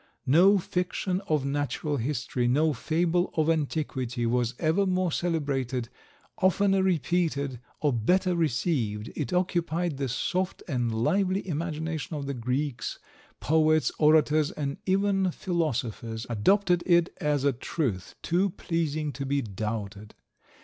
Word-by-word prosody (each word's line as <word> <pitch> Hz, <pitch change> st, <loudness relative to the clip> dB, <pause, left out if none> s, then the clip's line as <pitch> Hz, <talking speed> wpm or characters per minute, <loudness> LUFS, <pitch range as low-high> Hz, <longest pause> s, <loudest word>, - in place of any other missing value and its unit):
'No 180 Hz, +9 st, +6 dB
fiction 180 Hz, +1 st, -2 dB
of 150 Hz, -3 st, +1 dB
natural 145 Hz, +1 st, -1 dB
history, 125 Hz, -1 st, -1 dB
no 150 Hz, +5 st, +3 dB
fable 170 Hz, +6 st, 0 dB
of 160 Hz, +1 st, +3 dB
antiquity, 135 Hz, -6 st, -2 dB
was 120 Hz, +1 st, 0 dB
ever 175 Hz, +5 st, +2 dB
more 185 Hz, -1 st, +1 dB
celebrated, 135 Hz, -8 st, -1 dB, 0.5 s
oftener 195 Hz, 0 st, +3 dB
repeated, 160 Hz, -6 st, 0 dB, 0.2 s
or 145 Hz, -3 st, +2 dB
better 180 Hz, -, +2 dB
received; 125 Hz, -9 st, -1 dB
it -, -, -3 dB
occupied 175 Hz, -3 st, 0 dB
the 135 Hz, -2 st, -2 dB
soft 180 Hz, +10 st, -2 dB
and 120 Hz, -6 st, -1 dB
lively 185 Hz, -, +1 dB
imagination 160 Hz, -1 st, -3 dB
of 145 Hz, -2 st, -4 dB
the 140 Hz, -, -3 dB
Greeks; 125 Hz, +1 st, -2 dB, 0.4 s
poets, 155 Hz, 0 st, +3 dB
orators, 155 Hz, -1 st, +4 dB
and 140 Hz, -2 st, -4 dB
even 195 Hz, 0 st, +2 dB
philosophers, 125 Hz, -, -2 dB
adopted 180 Hz, -, +3 dB
it 175 Hz, -1 st, +3 dB
as 145 Hz, -2 st, +1 dB
a 140 Hz, -1 st, +3 dB
truth 120 Hz, -, -3 dB
too 180 Hz, +4 st, +2 dB
pleasing 155 Hz, -4 st, -2 dB
to 140 Hz, -, -5 dB
be 140 Hz, +1 st, 0 dB
doubted. 105 Hz, 0 st, -5 dB
155 Hz, 125 wpm, -27 LUFS, 130-175 Hz, 0.5 s, No